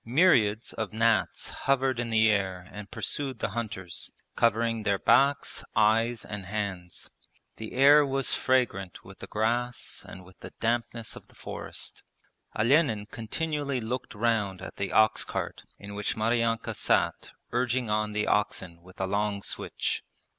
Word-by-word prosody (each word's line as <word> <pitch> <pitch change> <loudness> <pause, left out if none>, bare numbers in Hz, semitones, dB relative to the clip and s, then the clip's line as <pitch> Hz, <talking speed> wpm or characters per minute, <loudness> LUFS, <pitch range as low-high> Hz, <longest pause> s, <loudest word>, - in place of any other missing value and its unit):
Myriads 120 - +3
of 110 -3 -3
gnats 115 -1 +1
hovered 135 -2 +1
in 120 -1 -2
the 110 -1 +4
air 95 -3 -1
and 105 -1 -8
pursued 135 -3 -3
the - - -2
hunters, 95 -5 -5 0.3
covering 115 0 +2
their 100 -2 +1
backs, 140 +7 +3
eyes, 115 +2 +3
and 105 -3 -6
hands. 100 -4 -4 0.5
The 110 - -7
air 140 +3 +7
was 135 -1 +1
fragrant 115 -8 0
with - - -13
the - - -8
grass 120 +3 -1
and 95 -1 -10
with 90 0 -18
the - - -10
dampness 115 -1 -1
of - - -12
the - - -21
forest. - - -7 0.6
Olenin 115 -2 +3
continually 140 +3 -2
looked 120 +1 -4
round 105 -4 +1
at - - -9
the 100 -1 -2
ox 110 0 +4
cart - - -4 0.2
in 100 0 -9
which 105 +1 -2
Maryanka 115 +1 +1
sat - - +1 0.2
urging 125 -2 0
on 105 0 0
the 105 0 0
oxen 90 -4 0
with 90 +1 -17
a 95 - +1
long 100 +1 -1
switch. - - -2
110 Hz, 150 wpm, -28 LUFS, 105-120 Hz, 0.6 s, air